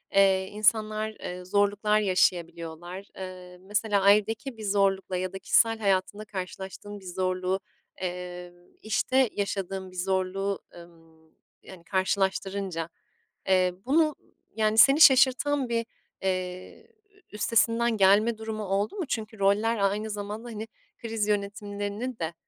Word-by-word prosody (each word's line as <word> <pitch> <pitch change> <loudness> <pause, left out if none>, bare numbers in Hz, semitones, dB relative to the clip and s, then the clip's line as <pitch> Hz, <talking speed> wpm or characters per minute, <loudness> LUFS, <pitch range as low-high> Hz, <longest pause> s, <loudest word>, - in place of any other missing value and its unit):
eee, 190 -1 +4
insanlar, 215 +1 +1
eee, 180 -3 -8
zorluklar 205 +2 +2
yaşayabiliyorlar. 175 -1 -1
Eee, 185 -1 -9
mesela 205 +1 0
ailedeki 215 +5 +2
bir 220 - -8
zorlukla 195 -2 +1
ya 185 +1 -3
da 195 - -6
kişisel 225 +4 +3
hayatında 200 +1 0
karşılaştığın 195 +1 -7
bir 190 - -17
zorluğu, 185 +1 -1 0.4
eee, 180 -1 -5 0.3
işte 245 +4 +2
yaşadığın 195 -2 -3
bir 185 - -16
zorluğu, 190 +1 -1 0.2
ımm, 165 -2 -17 0.3
yani, 180 -3 -13
karşılaştırınca. 190 -2 -1 0.6
Eee, 185 -1 +3
bunu, 305 +2 +3 0.4
yani, 215 0 +1
seni 275 +7 +7
şaşırtan 265 0 +5
bir, 230 -1 0 0.4
eee, 185 - -4 0.4
üstesinden 230 +2 +2
gelme 205 +4 +4
durumu 220 -1 -5
oldu 200 - -1
mu? 370 - -3
Çünkü 220 -2 -4
roller 210 +4 +2
aynı 205 +2 0
zamanda, 210 +3 -5
hani, 220 0 -6 0.3
kriz 225 -2 -2
yönetimlerini 205 +3 -3
de, 165 0 -3
200 Hz, 120 wpm, -27 LUFS, 185-215 Hz, 0.6 s, seni